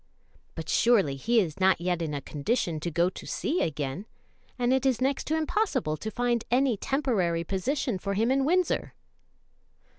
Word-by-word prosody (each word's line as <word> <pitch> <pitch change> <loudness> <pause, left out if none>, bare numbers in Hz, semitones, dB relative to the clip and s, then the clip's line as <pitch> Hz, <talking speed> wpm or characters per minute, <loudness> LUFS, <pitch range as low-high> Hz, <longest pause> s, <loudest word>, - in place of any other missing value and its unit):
"But 160 -1 -6
surely 200 - +3
he 230 - +2
is 170 -6 -2
not 190 0 +4
yet 175 0 -1
in 155 -3 -2
a 140 - -3
condition 160 - -1
to 170 - -3
go 170 +2 +2
to - - -10
sea 340 +5 -1
again, 150 +5 -3 0.5
and 245 0 +2
it 265 0 +1
is 260 -4 +2
next 270 +2 0
to 315 - +1
impossible 310 - 0
to 215 +8 -5
find 240 0 0
any 255 0 +3
temporary 200 - 0
position 210 - -1
for 200 +2 -3
him 225 +5 +2
in 270 0 +2
Windsor." 355 +4 +1
220 Hz, 175 wpm, -27 LUFS, 170-265 Hz, 0.5 s, not